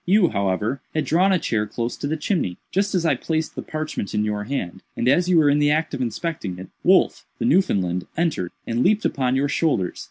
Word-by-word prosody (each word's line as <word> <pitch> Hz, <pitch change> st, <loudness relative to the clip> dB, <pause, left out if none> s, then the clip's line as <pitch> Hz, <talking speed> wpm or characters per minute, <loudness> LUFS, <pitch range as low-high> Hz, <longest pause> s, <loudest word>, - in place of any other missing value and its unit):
You, 185 Hz, -1 st, +4 dB
however, 100 Hz, +6 st, -1 dB
had 155 Hz, -, +1 dB
drawn 185 Hz, +4 st, +3 dB
a 185 Hz, -, +4 dB
chair 105 Hz, -9 st, -1 dB
close 115 Hz, +3 st, -3 dB
to -, -, -3 dB
the 160 Hz, +2 st, -1 dB
chimney. 150 Hz, -, -1 dB
Just 200 Hz, +1 st, 0 dB
as 175 Hz, -2 st, +1 dB
I 160 Hz, -, +4 dB
placed 160 Hz, -1 st, -2 dB
the -, -, -5 dB
parchment 155 Hz, -10 st, -4 dB
in 105 Hz, 0 st, +1 dB
your 105 Hz, -1 st, -2 dB
hand, 95 Hz, -8 st, -4 dB, 0.2 s
and 120 Hz, -, 0 dB
as 175 Hz, +7 st, +3 dB
you 180 Hz, -, +4 dB
were 155 Hz, -2 st, +5 dB
in 145 Hz, +1 st, +4 dB
the 145 Hz, 0 st, +3 dB
act 155 Hz, +2 st, +1 dB
of -, -, -3 dB
inspecting 120 Hz, -, -3 dB
it, 95 Hz, -, -9 dB
Wolf, -, -, +3 dB
the -, -, -2 dB
Newfoundland, 90 Hz, -, +1 dB
entered, 160 Hz, -, 0 dB
and 115 Hz, +1 st, -1 dB
leaped 215 Hz, +2 st, +2 dB
upon 130 Hz, -2 st, +1 dB
your 140 Hz, +2 st, +2 dB
shoulders. 145 Hz, -, 0 dB
145 Hz, 225 wpm, -23 LUFS, 105-165 Hz, 0.2 s, were